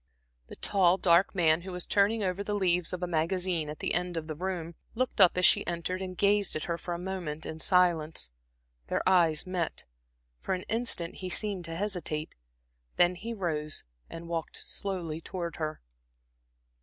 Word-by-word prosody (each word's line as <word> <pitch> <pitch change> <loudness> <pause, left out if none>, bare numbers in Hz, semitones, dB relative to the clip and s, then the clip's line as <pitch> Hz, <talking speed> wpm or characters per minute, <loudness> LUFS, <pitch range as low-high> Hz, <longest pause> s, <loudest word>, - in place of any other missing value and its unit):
The - - -10
tall 190 -3 +3
dark 180 +1 +4
man 165 -2 +4
who 190 +2 -7
was 180 -1 -2
turning 210 +2 +2
over 190 +1 -1
the 205 0 -2
leaves 180 -3 +1
of 180 -1 -4
a - - 0
magazine 170 -1 0
at 150 - -6
the - - -2
end 180 0 -1
of 160 - -3
the 155 - -4
room, 170 0 -4 0.2
looked 250 -3 0
up 180 -1 +7
as 180 - +4
she - - +6
entered 175 +2 -2
and 185 -1 -5
gazed 205 0 +2
at 155 - -2
her 170 - -1
for 175 -2 -4
a - - -4
moment 175 -4 -4
in 160 - -6
silence. 165 - +2 0.6
Their - - -1
eyes 170 -4 +4
met; 180 -3 -2 0.6
for 190 - -1
an 185 - -6
instant 225 -7 -1
he 185 - -5
seemed 195 -1 -1
to 165 0 -5
hesitate. 175 -5 -3 0.6
Then 175 0 +4
he 215 +6 -6
rose 155 -6 -1 0.3
and 165 0 -8
walked 165 -2 -3
slowly 170 -5 -3
towards 170 -2 -5
her. 155 -1 -3
180 Hz, 180 wpm, -30 LUFS, 165-190 Hz, 0.6 s, up